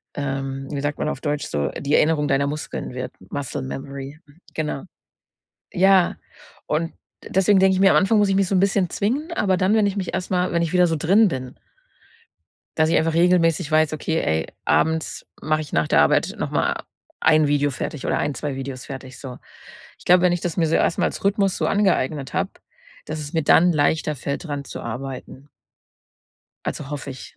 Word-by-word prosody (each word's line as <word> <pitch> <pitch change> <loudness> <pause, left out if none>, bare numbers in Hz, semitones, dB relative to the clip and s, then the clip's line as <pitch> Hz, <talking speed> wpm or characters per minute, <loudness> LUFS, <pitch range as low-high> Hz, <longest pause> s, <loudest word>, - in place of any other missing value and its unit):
ähm- 135 -1 -3
wie 140 -2 -3
sagt 145 0 -2
man - - 0
auf - - -5
deutsch- 145 -1 -2
so 70 -1 -1
die 145 +1 +1
Erinnerung 150 -2 +3
deiner 140 0 +1
Muskeln 150 -3 -5
wird. 130 0 -5 0.2
Muscle 145 -1 -4
Memory, 135 +2 -7 0.3
genau. 150 -3 -3 0.9
Ja, 190 -1 +4 0.5
und 165 +2 -1 0.4
deswegen 190 +1 +4
denke 190 0 +4
ich 185 - -1
mir, 195 - +6
am - - +5
Anfang 205 +3 +3
muss 205 -1 +3
ich 190 - +2
mich 195 -1 +2
so 195 - 0
'n - - +4
bisschen 195 -2 +2
zwingen. 275 - -2
Aber 190 - +1
dann, 190 +4 +2
wenn 215 -2 +3
ich 200 - -3
mich 190 -2 -3
erst 180 - -4
mal 180 0 +1
wenn 170 - +2
ich 170 +1 -3
wieder 180 -1 +5
so 165 - 0
drin 195 +9 +4
bin 130 -2 -6 1.2
dass 160 0 +3
ich 165 - +3
einfach 160 0 +1
regelmäßig 165 -2 +3
weiß: 155 0 +3
„Okay, 160 +1 -1
ey, 80 0 0 0.2
abends 160 0 0 0.2
mache 155 0 0
ich 150 - -9
nach 80 -1 +2
der - - +4
Arbeit - - +2
noch - - -3
mal - - 0 0.4
ein 155 -1 +4
Video 145 0 +1
fertig 135 +1 -5
oder - - +1
1, 145 -1 -1
2 145 -3 -4
Videos 135 -1 -6
fertig“, 130 -1 -9
so. 130 -3 -8 0.6
Ich - - -18
glaube, 180 0 +6
wenn 180 -1 +4
ich 175 - -2
das 175 -3 -3
mir 165 -2 +2
so 160 - +1
erst - - +1
mal - - +3
als - - -4
Rhythmus 200 -1 +2
so - - 0
angeeignet 155 -9 0
habe, 190 +1 0 0.6
dass 155 0 -5
es 145 -1 -6
mir 160 -2 +1
dann 175 +4 +5
leichter 155 +1 +1
fällt, 140 +4 -4
dran 145 -3 -4
zu - - -8
arbeiten. 130 +3 -7 1.2
Also 145 -2 -4
hoffe 145 -2 -5
ich. 130 - -11
155 Hz, 205 wpm, -22 LUFS, 140-180 Hz, 1.2 s, mir